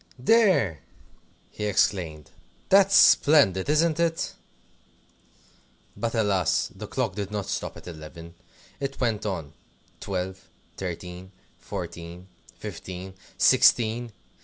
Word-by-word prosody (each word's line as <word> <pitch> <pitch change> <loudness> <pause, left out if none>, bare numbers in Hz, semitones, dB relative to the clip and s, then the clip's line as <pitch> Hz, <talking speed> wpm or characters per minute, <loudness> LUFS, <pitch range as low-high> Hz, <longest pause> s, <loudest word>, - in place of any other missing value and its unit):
"There!" 140 - +3 0.7
he 105 - -5
exclaimed; 85 -7 0 0.4
"that's 195 0 +5
splendid, 140 - +5
isn't 155 +1 +2
it?" 165 -1 0 1.6
But 115 0 -3
alas! 100 -6 +1
the - - -8
clock 95 - -2
did 100 -1 -4
not 105 -2 -3
stop - - -4
at - - -13
eleven. 85 0 -10 0.5
It 135 0 -4
went 115 -4 -1
on 80 -7 -4 0.5
Twelve, 95 -1 -4 0.3
Thirteen, 90 0 -7 0.3
Fourteen, 85 +2 -7 0.3
Fifteen, 95 +1 -8 0.2
Sixteen! 115 +1 +4
100 Hz, 100 wpm, -26 LUFS, 90-125 Hz, 1.6 s, that's